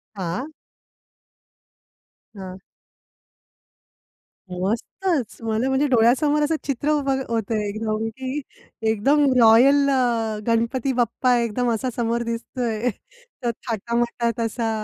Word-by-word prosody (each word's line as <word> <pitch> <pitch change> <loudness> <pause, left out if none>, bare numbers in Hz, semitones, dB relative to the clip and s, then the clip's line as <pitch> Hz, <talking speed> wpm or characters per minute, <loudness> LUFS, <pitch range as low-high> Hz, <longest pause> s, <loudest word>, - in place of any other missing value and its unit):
हां. 190 - -3 1.9
हां. 190 -2 -8 1.9
मस्तच! 230 - -2
मला 225 +3 0
म्हणजे 265 +2 +2
डोळ्यासमोर 265 +5 +3
असं 310 +2 +1
चित्र 285 +2 -1
उभं 275 -3 +1
होतं 225 -1 -1
आहे 210 -1 -1
एकदम, 215 +1 -2
की 260 +5 -5 0.5
एकदम 275 +8 +3 0.2
"रॉयल" 265 +6 +6
अ, 235 -5 +1
गणपती 235 +3 +1
बाप्पा 245 +2 +2
एकदम 235 +1 0
असा 240 +4 -2
समोर 235 0 0
दिसतो 235 +2 -5
आहे. 225 +3 -1 0.8
थाटामाटात 235 +1 -1
असा 225 0 -2
235 Hz, 100 wpm, -23 LUFS, 225-265 Hz, 1.9 s, रॉयल